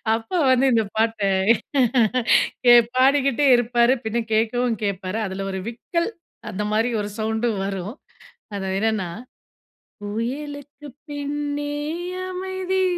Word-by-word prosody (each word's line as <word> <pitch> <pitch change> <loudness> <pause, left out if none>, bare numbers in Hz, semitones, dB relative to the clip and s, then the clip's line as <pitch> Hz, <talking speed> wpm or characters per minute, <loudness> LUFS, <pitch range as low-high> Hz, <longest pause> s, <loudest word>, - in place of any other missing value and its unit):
அப்பா 225 +11 -3
வந்து, 260 +1 +4
இந்த 225 -1 +3
பாட்ட 225 -1 +1 1.4
கே 240 - +9 0.2
பாடிக்கிட்டே 275 +1 +3
இருப்பாரு. 240 +1 +3
பின்ன 230 +1 -1
கேட்கவும் 230 +1 +1
கேட்பாரு. 190 0 -3
அதில 190 +1 -5
ஒரு 190 - -3
விக்கல் 335 - -2 0.4
அந்த 205 +3 -3
மாதிரி 225 +3 +2
ஒரு 205 - -4
சவுண்டும் 220 -1 -1
வரும். 195 +3 -4 0.6
அது 195 -1 -3
என்னன்னா, 215 -4 0 0.9
புயலுக்குப் 285 +6 -6
பின்னே 290 0 -3 0.6
அமைதி, 375 0 -2
235 Hz, 105 wpm, -23 LUFS, 215-285 Hz, 1.4 s, கே